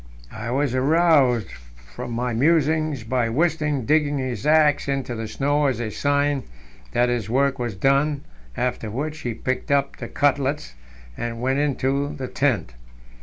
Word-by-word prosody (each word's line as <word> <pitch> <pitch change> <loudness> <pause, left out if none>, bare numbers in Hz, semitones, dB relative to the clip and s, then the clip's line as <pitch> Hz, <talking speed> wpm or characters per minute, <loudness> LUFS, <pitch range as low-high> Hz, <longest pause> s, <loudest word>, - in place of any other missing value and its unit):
I 110 +2 -5
was 135 +1 0
aroused 135 -4 +3 0.4
from 120 - -6
my 120 +1 -1
musings 155 0 +2
by 115 0 0
Wisting 150 -1 0
digging 150 +1 +2
his 130 -3 -3
axe 150 -2 +4
into 135 -3 -2
the 110 -1 -4
snow 145 +6 +1
as 130 -4 -1
a 115 -2 -3
sign 145 +2 +1 0.5
that 120 +1 +2
his 120 -4 -2
work 140 +2 +1
was 120 -4 -3
done, 140 +6 +2 0.3
after 125 -3 -2
which 150 +8 -4
he 120 -6 -4
picked 130 +2 -3
up 140 -1 +1
the - - -6
cutlets, 140 - 0 0.4
and 115 - -4
went 130 +3 0
into 140 0 0
the 130 -3 -5
tent. 120 - 0
135 Hz, 155 wpm, -23 LUFS, 120-145 Hz, 0.5 s, axe